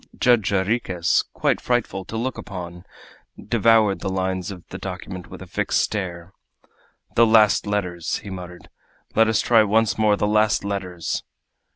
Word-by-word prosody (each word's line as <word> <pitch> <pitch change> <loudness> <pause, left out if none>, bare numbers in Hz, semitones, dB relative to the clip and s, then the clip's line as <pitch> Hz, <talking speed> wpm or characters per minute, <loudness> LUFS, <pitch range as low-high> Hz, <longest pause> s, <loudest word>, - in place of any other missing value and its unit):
Judge 120 -5 +3
Jarriquez, 95 -3 +1
quite - - 0
frightful 120 -6 -1
to 110 - -6
look 125 +3 -3
upon, 90 -2 -8 0.5
devoured 110 -2 +3
the - - -3
lines 95 -1 -2
of 90 -3 -9
the - - -7
document 90 -1 -7
with - - -9
a - - -10
fixed - - -1
stare. 90 -3 -3 0.8
"The 115 0 +5
last 110 -3 +4
letters!" 90 -5 -2
he 100 - -9
muttered. 90 -2 -9 0.4
"Let 115 +1 +4
us 110 -1 +2
try 115 -2 +5
once 110 +1 +2
more 105 -1 +3
the - - 0
last 105 0 +2
letters!" 90 -4 -3
100 Hz, 155 wpm, -22 LUFS, 90-110 Hz, 0.8 s, The